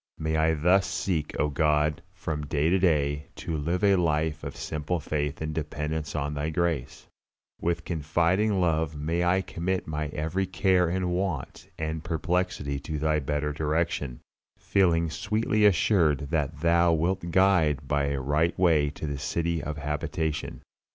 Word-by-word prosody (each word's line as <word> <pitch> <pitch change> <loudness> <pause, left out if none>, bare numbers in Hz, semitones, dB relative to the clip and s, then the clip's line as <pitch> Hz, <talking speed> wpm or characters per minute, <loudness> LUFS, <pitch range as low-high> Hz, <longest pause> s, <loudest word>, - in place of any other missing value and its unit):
May 80 0 -1
I 80 +1 +3
thus 90 +5 +3
seek, 85 -3 -2
O 75 - +2
God, 75 +1 +1
from 75 -2 -4
day 75 +3 +1
to 95 - +3
day, 75 -5 +1
to 85 - -4
live 85 +6 -1
a 100 -1 +5
life 80 -2 0
of - - -6
simple 80 +3 -3
faith 75 -1 -3
and 80 0 -3
dependence 75 0 -3
on 75 0 -2
Thy 75 +1 -2
grace; 80 -5 -2 0.6
with 85 0 -1
confiding 85 +6 +1
love 80 -3 +1
may 80 +4 -1
I 90 +2 +3
commit 90 +1 -2
my 75 -1 -3
every 80 +6 -2
care 90 -3 +2
and 90 0 -1
want 90 -6 -3
and 80 0 -3
perplexity 85 -4 -1
to 75 +2 -5
Thy 75 +1 +1
better 75 +1 -2
direction, 75 -4 -1 0.4
feeling 85 -4 +2
sweetly 110 +1 +1
assured 80 -7 +2
that 75 -2 -1
Thou 85 0 +4
wilt 85 +2 0
guide 85 -6 +3
me - - -16
by 70 0 +1
a 70 -1 -1
right 75 +6 +1
way 80 -5 +3
to 75 - -7
the 70 -2 -3
city 85 +1 -1
of 75 +1 -5
habitation. 75 +1 -3
80 Hz, 160 wpm, -27 LUFS, 75-85 Hz, 0.6 s, a